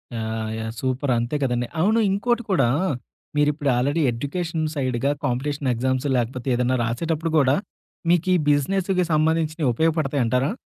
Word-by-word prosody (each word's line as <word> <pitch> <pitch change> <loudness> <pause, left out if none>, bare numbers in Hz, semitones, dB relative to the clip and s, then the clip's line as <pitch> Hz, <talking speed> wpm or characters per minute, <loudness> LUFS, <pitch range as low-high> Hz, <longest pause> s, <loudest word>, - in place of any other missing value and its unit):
Yeah! 110 -1 -3
Yeah! 110 0 -4
Super 130 +1 -1
అంతే 120 +4 -1
కదండి. 120 -2 0
అవును 215 +6 +3
ఇంకోటి 240 +5 0
కూడా. 175 -10 +3 0.7
మీరిప్పుడు 150 0 +2
ఆల్‌రడీ 140 +6 +1
ఎడ్యుకేషన్ 160 +6 -3
సైడ్‌గా 130 -1 0
కాంపిటీషన్ 140 +2 -1
ఎగ్జామ్స్ 130 +3 -1
లేకపోతే 125 +2 -3
ఏదన్నా 125 +1 +1
రాసేటప్పుడు 160 +8 -1
కూడా 135 -1 +4 0.5
మీకీ 175 +1 +3 0.2
బిజినెస్‌కి 180 +6 +1
సంబంధించియి 160 0 +1
ఉపయోగపడతాయంటారా? 140 -3 +1
145 Hz, 125 wpm, -23 LUFS, 125-165 Hz, 0.7 s, కూడా